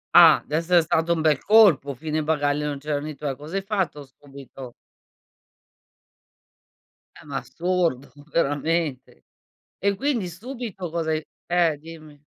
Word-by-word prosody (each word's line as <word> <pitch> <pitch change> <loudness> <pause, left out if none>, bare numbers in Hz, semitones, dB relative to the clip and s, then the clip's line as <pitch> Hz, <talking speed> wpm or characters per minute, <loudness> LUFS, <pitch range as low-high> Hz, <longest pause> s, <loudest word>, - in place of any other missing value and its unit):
Ah, - - +8
d'esser 165 +3 +2
stato 165 +1 +1
un 165 - -2
bel 155 -3 +2
colpo, 180 - +5
"fine 155 +3 -2
bagaglio" 150 -1 0
e - - -1
non 145 - -3
c'erano 150 +1 -3
i 150 - -7
tuoi. 140 -1 -4
Cosa 150 +6 -9
hai 195 - -1
fatto, 190 -8 -2
subito? 135 -2 -12 2.5
Eh, - - -18
ma 140 -2 -4
assurdo, 165 +1 -2 0.2
veramente. 150 -2 -1 0.6
E 200 0 +1
quindi 255 -6 -1
subito 210 -1 -7
cosa 160 -1 -2
hai 155 0 -1 0.2
eh, 170 -3 +2
dimmi. 155 -1 -13
155 Hz, 135 wpm, -24 LUFS, 145-175 Hz, 2.5 s, Ah